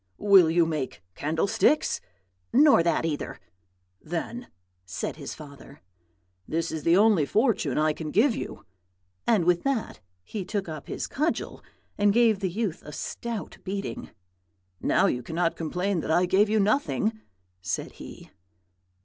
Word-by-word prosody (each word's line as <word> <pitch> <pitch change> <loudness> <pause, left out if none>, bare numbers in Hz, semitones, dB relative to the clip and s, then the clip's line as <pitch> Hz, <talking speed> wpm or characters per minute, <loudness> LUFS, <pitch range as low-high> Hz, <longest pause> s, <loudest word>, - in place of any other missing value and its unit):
"'Will 195 -5 +6
you 170 +1 +3
make 145 - -4
candlesticks?' 200 - +1 0.5
"'Nor 280 - +6
that 165 -1 +1
either.' 150 -3 -3 0.6
"'Then,' 205 +9 -5 0.4
said 95 0 -5
his - - -7
father, 140 -2 -13 0.7
'this 165 +1 -1
is 160 - -4
the 170 +4 +4
only 205 -6 +5
fortune 205 - +1
I 155 0 +2
can 155 0 -6
give 225 - +3
you;' - - -7 0.6
and 210 -8 +3
with 175 -1 +3
that 275 -5 -2 0.2
he 200 - -5
took 195 +1 -3
up 155 -3 -7
his - - -3
cudgel 305 +4 -2 0.4
and 205 0 +4
gave 225 -2 +4
the 190 -2 -1
youth 200 -1 -3
a 150 - -9
stout 230 +7 -5
beating. 195 +1 -5 0.7
'Now - - +3
you 125 - 0
cannot 165 +6 -1
complain 180 +4 -1
that - - -5
I 175 +3 +4
gave 195 +3 +3
you 215 0 +2
nothing,' 220 0 +1 0.4
said 95 +1 -3
he. - - -12
185 Hz, 145 wpm, -26 LUFS, 160-220 Hz, 0.7 s, Will